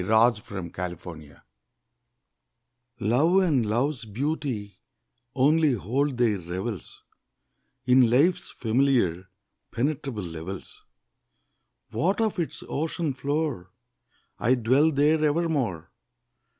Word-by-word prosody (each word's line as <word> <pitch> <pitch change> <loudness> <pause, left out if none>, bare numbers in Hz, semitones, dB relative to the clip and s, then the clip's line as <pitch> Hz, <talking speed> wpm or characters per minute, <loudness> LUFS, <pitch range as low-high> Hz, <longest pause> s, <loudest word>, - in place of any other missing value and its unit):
POET 110 +2 +3
AND 95 -5 -6
ANCHORITE 85 -4 -7 1.6
Love 140 - +3
and 145 -9 +2
love's 120 +4 0
beauty 115 -4 -3 0.6
only 150 +2 +4
hold 125 +6 -1
their 115 -5 +2
revels 90 +3 -6 0.8
In 125 -2 +5
life's 165 +9 +2
familiar, 115 -7 +1 0.4
penetrable 135 -4 -2
levels: 85 +3 -8 1.1
What 190 +7 0
of 220 -4 0
its 165 - -3
ocean 160 0 -2
floor? 140 - -2 0.7
I 125 +3 +3
dwell 130 +7 +3
there 150 +2 +3
evermore. 145 - 0
125 Hz, 90 wpm, -26 LUFS, 100-150 Hz, 1.6 s, In